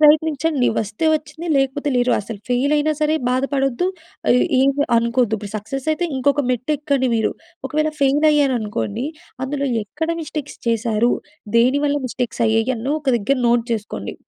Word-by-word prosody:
ప్రయత్నించండి. 305 -2 +3
వస్తే 215 +8 -4
వచ్చింది 310 +2 -5
లేకపోతే 270 +2 0
లేరు. 245 0 +2
అసలు 210 +1 -7
ఫెయిల్ 255 +4 +1
అయినా 305 +1 +2
సరే 305 0 +2 0.2
బాధపడొద్దు. 270 +4 0 0.4
ఆహ్, 250 - +5
ఏమీ 275 +2 +3
అనుకోద్దు. 235 -1 +2
ఇప్పుడు 200 -1 -8
సక్సెస్ 255 +7 -5
అయితే, 350 +3 -1
ఇంకొక 285 +2 +2
మెట్టు 250 +3 -2
ఎక్కండి 280 -3 +1
మీరు. 220 - +1 0.4
ఒకవేళ, 310 0 0
ఫెయిల్ 280 +3 +3
అయ్యారనుకోండి! 240 -5 0 0.4
అందులో, 280 +1 -2 0.2
ఎక్కడ 300 +10 -4
మిస్టేక్స్ 300 -1 -6
చేశారు? 230 0 +1 0.5
దేని 255 +5 +4
వల్ల, 285 - +1
మిస్టేక్స్ 245 -1 -4
అయ్యాయి! 225 +2 +2
అని 240 +5 -3
ఒక 290 - -22
దగ్గర 260 +6 0
నోట్ 235 -1 +3
చేసుకోండి. 215 -2 -4
270 Hz, 150 wpm, -20 LUFS, 235-295 Hz, 0.5 s, ఆహ్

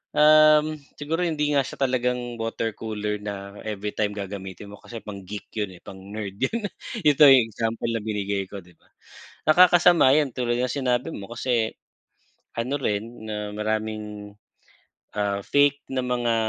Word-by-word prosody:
Uhm, 155 0 +6 0.2
siguro 160 +4 -2
hindi 150 -4 0
nga 140 - +4
siya 130 - -7
talagang 125 -1 -1
water 115 -1 -2
cooler 105 -1 -3
na 100 -1 -7
everytime 105 0 -2
gagamitin 100 0 -6
mo 105 - -11
kasi 120 - -9
pang-geek 100 0 -7
'yon 105 -4 -3
eh, - - -22
pang-nerd 100 +1 -7
'yon. 215 - 0 0.4
Ito 145 -1 +7
yung 130 -4 +7
example 115 +1 -2
na 115 - -2
binigay 100 -2 -2
ko, 100 - -7
'di 90 0 -20
ba? - - -30 0.6
Nakakasama 175 -4 +6
yan, 150 -3 +2
tulad 120 -1 0
ng 125 - 0
sinabi 130 +1 0
mo, 100 - -7
kasi, 120 -2 0 0.8
ano 125 +5 -1
rin 110 +1 -3
na 105 -1 -4
maraming, 105 -1 -3 0.8
ah, 100 -1 0
fake 145 0 +2
na 130 - 0
mga 120 -2 0
115 Hz, 150 wpm, -25 LUFS, 105-135 Hz, 0.8 s, Ito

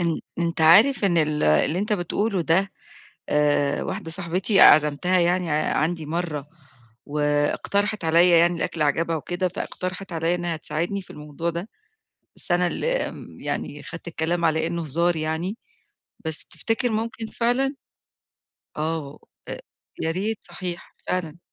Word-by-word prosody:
أن 170 -2 0 0.2
أنت 170 0 -1
عارف 200 - +6
إن 175 -4 +3
ال 150 -1 +1
اللي 75 - +3
أنت 210 +3 -1
بتقوله 200 +2 0
ده 185 +5 +2 0.6
آآ 145 -1 +2
واحدة 165 - -5
صاحبتي 185 +3 +1
عزَمتها 155 +5 +6
يعني 175 0 +1
عندي 155 +2 0
مرّة، 155 -3 -3 0.6
واقترحت 150 +8 0
عليَّ 170 +2 +5
يعني 170 +1 +3
الأكل 165 -1 -2
عجبها 165 +3 +1
وكده 175 +4 -2
فاقترحت 185 0 -5
عليَّ 165 +1 0
إنها 175 -2 -2
تساعدني 165 +6 -2
في - - -20
الموضوع 150 +3 -4
ده، 170 +5 -5 0.7
بس - - -2
أنا 175 0 +3
اللي 480 - -1 0.2
آمم - - -11
يعني 145 0 -4
خدت 175 0 -9
الكلام 170 +1 -1
على 160 0 +2
إنه 170 0 -2
هزار 170 +4 +1
يعني، 160 +6 -2 0.7
بس 160 -2 0
تفتكر 225 +9 -1
ممكن 225 +1 -3
فعلًا؟ 250 +5 0 1.0
آه 160 +2 -1
و - - -12 0.3
أ - - -4 0.4
يا 160 - 0
ريت 205 +6 -2
صحيح 175 -2 -6
فعلًا. 170 -3 -2
170 Hz, 140 wpm, -24 LUFS, 155-185 Hz, 1.0 s, عارف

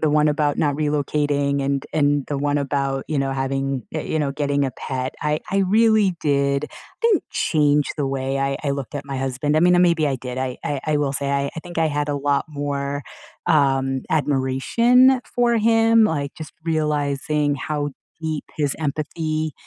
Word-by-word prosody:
the 155 - +2
one 150 0 +3
about 145 -1 0
not 145 -2 +2
relocating 145 -1 0
and 140 0 -1
and 145 -2 +2
the 145 - -2
one 145 +1 0
about, 140 -1 -1
you 155 -2 0
know, 135 0 0
having, 135 0 -2
y 155 - -2
you 160 - -2
know, 145 -2 0
getting 145 -1 0
a 135 - -1
pet, 130 +1 -4
I 150 0 0
I 195 - +1
really 210 0 +3
did 140 0 +1 0.3
didn't 455 -6 +2
change 150 -2 +2
the 145 -3 -1
way 135 0 -2
I 135 0 0
I 140 - -1
looked 140 0 -4
at 145 0 -5
my 135 - -4
husband. 135 +3 -1
I - - +4
mean, 180 +1 +5
uh, - - +4
maybe 170 -3 +3
I 135 - 0
did, 125 0 -7
I 130 -1 -3 0.3
I 155 -1 +1
will 140 -2 0
say, 140 0 -1
I 140 0 0
think 175 -2 -7
I 160 - +3
had 145 -1 -1
a 145 - -1
lot 140 0 +1
more, 145 -1 -3 0.4
um, 135 -5 +2
admiration 160 - +3
for 240 -1 +1
him, 225 0 +4
like, 145 -7 -1
just 155 - -9
realizing 150 -2 0
how 145 +1 -3 0.3
deep 155 -2 -3
his 145 -3 0
empathy 155 +1 -2
145 Hz, 185 wpm, -22 LUFS, 140-155 Hz, 0.4 s, mean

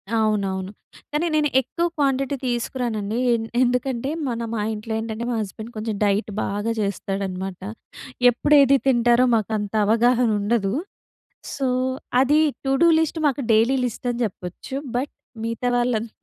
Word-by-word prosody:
అవునవును. 200 -3 0 0.4
కానీ, 300 +3 0
నేను 300 -1 +2
ఎక్కువ 335 +7 -2
క్వాంటిటీ 275 -1 +1
తీసుకురానండి 235 -3 -2
ఏ - - +5 0.3
ఎందుకంటే, 250 +1 0 0.2
మన 235 -2 -2
మా 215 - -1
ఇంట్లో 215 +1 -5
ఏంటంటే, 225 +1 -4
మా 230 - -1
హస్బెండ్ 220 +3 -7
కొంచెం 215 -1 -3
డైట్ 205 +2 +1
బాగా 205 +3 -2
చేస్తాడనమాట. 195 -2 -3 0.7
ఎప్పుడు 290 +5 +2
ఏది 275 0 +5
తింటారో 240 0 +4
మాకు 220 0 -1
అంత 205 0 -5
అవగాహన 240 +2 +3
ఉండదు. 205 -2 0 0.8
సో, 270 -2 -1 0.5
అది 295 +3 +4 0.3
టూడూ 270 +5 +3
లిస్ట్ 320 0 -1
మాకు 280 0 0
డైలీ 230 +5 +4
లిస్ట్ 245 +1 -4
అని 240 +1 -4
చెప్పొచ్చు. 180 +4 -7 0.2
బట్, 265 +4 -2 0.3
మిగతా 230 +2 -2
రాళ్ళం‌త 240 -2 0
235 Hz, 135 wpm, -23 LUFS, 210-260 Hz, 0.8 s, ఏ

